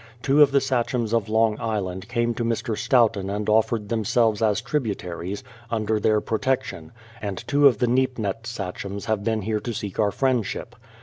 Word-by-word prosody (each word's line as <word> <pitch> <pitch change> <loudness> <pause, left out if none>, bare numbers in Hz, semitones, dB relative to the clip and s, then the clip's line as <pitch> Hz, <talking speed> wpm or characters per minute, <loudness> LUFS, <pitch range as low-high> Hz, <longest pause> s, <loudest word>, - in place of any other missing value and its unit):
Two 140 +2 +4
of 145 - +7
the 140 0 +3
sachems 120 -3 -1
of 115 -3 +1
Long 110 0 +2
Island 100 -4 -3
came 120 0 0
to 120 - -3
Mr. 115 -1 -1
Stoughton 115 -5 +2
and 105 +1 -3
offered 110 0 +2
them 115 -1 0
selves 110 0 +2
as 105 -2 +2
tributaries, 100 - -3 0.3
under 110 -1 0
their 105 0 +3
protection; 110 -8 -2 0.3
and 100 -3 -5
two 145 0 +5
of 125 -6 +3
the 125 - +2
Neep 130 +1 +1
nett 110 +1 -3
sachems 100 -2 -5
have 110 -2 -1
been 110 -1 0
here 110 +1 -1
to 120 +2 -4
seek 100 0 -5
our 105 -2 +3
friendship. 125 -1 -1
110 Hz, 185 wpm, -24 LUFS, 105-120 Hz, 0.3 s, of